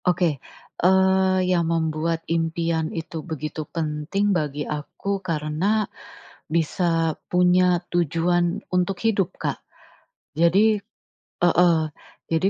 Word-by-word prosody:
Oke. 170 Hz, -6 st, +1 dB, 0.4 s
Eee, 190 Hz, +1 st, +4 dB
yang 175 Hz, -2 st, +1 dB
membuat 165 Hz, 0 st, -1 dB
impian 165 Hz, -1 st, -1 dB
itu 165 Hz, -1 st, -5 dB
begitu 155 Hz, -1 st, -5 dB
penting 165 Hz, +6 st, -1 dB
bagi 150 Hz, -4 st, -2 dB
aku, 190 Hz, +6 st, -4 dB
karena 170 Hz, +5 st, 0 dB, 0.6 s
bisa 165 Hz, 0 st, +1 dB, 0.2 s
punya 180 Hz, 0 st, +3 dB
tujuan 175 Hz, +3 st, +1 dB
untuk 180 Hz, +1 st, +1 dB
hidup, 205 Hz, -5 st, +1 dB
Kak. -, -, -3 dB, 0.8 s
Jadi 195 Hz, +7 st, +4 dB, 0.7 s
heeh, 175 Hz, -1 st, +5 dB, 0.5 s
jadi 165 Hz, +4 st, +1 dB
170 Hz, 95 wpm, -23 LUFS, 160-185 Hz, 0.8 s, heeh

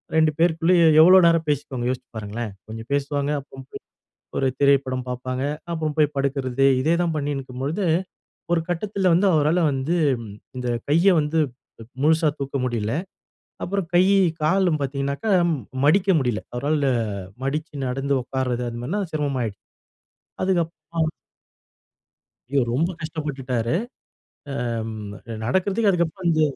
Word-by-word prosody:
2 160 Hz, -1 st, +4 dB
பேருக்குள்ளேயே 170 Hz, +1 st, +4 dB, 0.2 s
எவ்ளோ 185 Hz, +3 st, +8 dB
நேரம் 165 Hz, -1 st, +3 dB
பேசிக்குவாங்க 130 Hz, -4 st, -1 dB
யோசிச்சு 130 Hz, -, -4 dB
பாருங்களேன்! 110 Hz, +1 st, -5 dB, 0.2 s
கொஞ்சம் 115 Hz, +2 st, -8 dB
பேசுவாங்க. 145 Hz, 0 st, 0 dB
அப்ப 135 Hz, -1 st, -12 dB, 0.8 s
ஒரு 135 Hz, -, +1 dB
திரைப்படம் 135 Hz, -2 st, +2 dB
பார்ப்பாங்க. 130 Hz, +1 st, -3 dB, 0.3 s
அப்புறம் 155 Hz, -2 st, -2 dB
போய் 150 Hz, -1 st, +2 dB
படுக்கிறது. 135 Hz, -1 st, 0 dB, 0.2 s
இதே 160 Hz, +5 st, +2 dB
தான் 170 Hz, -2 st, 0 dB
பண்ணின்னு 145 Hz, -1 st, -2 dB
இருக்கும்பொழுது, 135 Hz, +9 st, -3 dB, 0.7 s
ஒரு 170 Hz, -, +3 dB
கட்டத்தில 190 Hz, +1 st, 0 dB
வந்து 190 Hz, +4 st, +3 dB
அவரால 155 Hz, +3 st, +3 dB
வந்து 135 Hz, +6 st, -1 dB, 0.6 s
இந்த 125 Hz, -1 st, -3 dB, 0.2 s
கைய 170 Hz, +6 st, +4 dB
வந்து 155 Hz, +2 st, 0 dB, 0.6 s
முழுசா 160 Hz, +1 st, +4 dB
தூக்க 140 Hz, 0 st, -3 dB
முடியல. 115 Hz, -3 st, -1 dB, 0.7 s
அப்புறம் 195 Hz, -1 st, -2 dB
கை, 175 Hz, -, +6 dB, 0.4 s
காலும் 175 Hz, 0 st, +2 dB
பாத்தங்கனாக்க, 140 Hz, -, -3 dB, 0.6 s
மடிக்க 195 Hz, +6 st, +4 dB
முடியல. 120 Hz, -5 st, 0 dB
அவரால 145 Hz, +3 st, 0 dB, 0.6 s
மடிச்சு 150 Hz, +3 st, -3 dB
நடந்து 135 Hz, +2 st, -1 dB
உட்கார்றது 125 Hz, -1 st, -2 dB
அந்தமாரிலாம் 150 Hz, -, -3 dB
சிரமமாயிடுச்சு. 130 Hz, -10 st, -2 dB, 0.8 s
அதுக்கு 185 Hz, -2 st, +2 dB
அப்புறம் 160 Hz, 0 st, -3 dB, 1.4 s
ஐயோ! 140 Hz, -2 st, +3 dB
ரொம்ப 165 Hz, +8 st, +1 dB
கஷ்டப்பட்டுட்டாரு. 135 Hz, -6 st, -3 dB, 0.9 s
ஆ, -, -, -1 dB
அம் 110 Hz, -2 st, -6 dB, 0.3 s
நடக்கிறதுக்கே 200 Hz, -, +1 dB
அதுக்கு 170 Hz, -1 st, +2 dB
அப்பறம் 175 Hz, +1 st, -3 dB
இந்த 155 Hz, -1 st, +2 dB
145 Hz, 120 wpm, -23 LUFS, 130-165 Hz, 1.4 s, எவ்ளோ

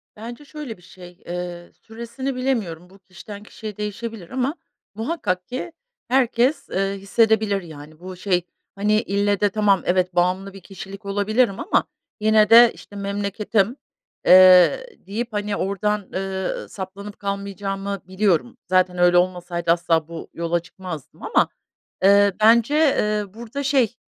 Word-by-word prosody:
Bence 235 Hz, +6 st, -9 dB
şöyle 285 Hz, -6 st, -8 dB
bir -, -, -22 dB
şey, 180 Hz, -1 st, -15 dB
eee, 175 Hz, 0 st, -6 dB
süresini 235 Hz, +4 st, -6 dB
bilemiyorum. 210 Hz, -10 st, -2 dB
Bu, 195 Hz, +1 st, -19 dB
kişiden 200 Hz, +2 st, -11 dB
kişiye 215 Hz, -1 st, -9 dB
değişebilir 210 Hz, -2 st, -6 dB
ama 260 Hz, +4 st, -1 dB, 0.4 s
muhakkak 220 Hz, -, -2 dB
ki 260 Hz, +7 st, -5 dB, 0.4 s
herkes, 255 Hz, +2 st, +1 dB
ııı, 195 Hz, +1 st, -1 dB
hissedebilir 215 Hz, 0 st, +2 dB
yani. 155 Hz, -2 st, -12 dB
Bu 185 Hz, +1 st, -8 dB
şey, 180 Hz, -1 st, 0 dB, 0.3 s
hani, 210 Hz, +2 st, +2 dB
ille 200 Hz, -2 st, 0 dB
de 205 Hz, -, +3 dB
tamam 200 Hz, -2 st, +2 dB
evet, 180 Hz, 0 st, +1 dB
bağımlı 185 Hz, +2 st, 0 dB
bir 195 Hz, -, -12 dB
kişilik 195 Hz, +2 st, -10 dB
olabilirim 205 Hz, +2 st, +1 dB
ama 395 Hz, -, +1 dB, 0.4 s
yine 215 Hz, 0 st, +4 dB
de, 235 Hz, +1 st, +8 dB
işte, 205 Hz, -, -15 dB
memleketim, 200 Hz, +2 st, -1 dB, 0.5 s
eee, 185 Hz, -, +7 dB, 0.2 s
deyip, 225 Hz, +3 st, -4 dB
hani, 205 Hz, 0 st, -2 dB
oradan, 200 Hz, +1 st, -1 dB
ııı, 190 Hz, 0 st, -3 dB
saplanıp 200 Hz, +1 st, -8 dB
kalmayacağımı 200 Hz, 0 st, -4 dB
biliyorum. 195 Hz, +4 st, 0 dB
Zaten 185 Hz, -1 st, +2 dB
öyle 175 Hz, 0 st, +4 dB
olmasaydı 175 Hz, -1 st, 0 dB
asla 165 Hz, -2 st, +1 dB
bu 165 Hz, -1 st, -9 dB
yola 170 Hz, +1 st, -1 dB
çıkmazdım 170 Hz, -3 st, -10 dB
ama, -, -, +2 dB, 0.6 s
ııı, 200 Hz, 0 st, +5 dB
bence, 235 Hz, +7 st, +4 dB
ııı, 210 Hz, -2 st, -1 dB
burada 235 Hz, +5 st, -6 dB
şey, 265 Hz, -4 st, +2 dB
200 Hz, 135 wpm, -22 LUFS, 185-225 Hz, 0.6 s, de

